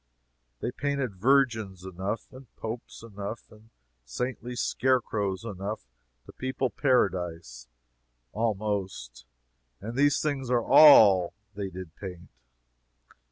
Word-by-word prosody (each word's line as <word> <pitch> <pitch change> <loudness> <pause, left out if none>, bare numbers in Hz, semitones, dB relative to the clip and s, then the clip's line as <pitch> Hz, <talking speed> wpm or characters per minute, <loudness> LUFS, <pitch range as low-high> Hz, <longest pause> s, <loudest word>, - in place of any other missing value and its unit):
They 120 - -2
painted 135 -6 -2
Virgins 110 -6 +1
enough, 95 +8 -5
and 130 0 -12
popes 115 0 -7
enough 105 0 -7
and 110 +1 -18 0.3
saintly 125 - -4
scarecrows 110 -8 0
enough, 100 - -5 0.4
to - - -12
people 130 0 -3
Paradise, 85 - 0 0.6
almost, 100 - -3 0.5
and 115 +4 -7
these 145 +1 +3
things 140 -4 -2
are 120 -2 +2
all 100 - +7 0.2
they 100 -1 -4
did 90 -3 -9
paint. 90 -3 -9
105 Hz, 105 wpm, -27 LUFS, 95-125 Hz, 0.6 s, all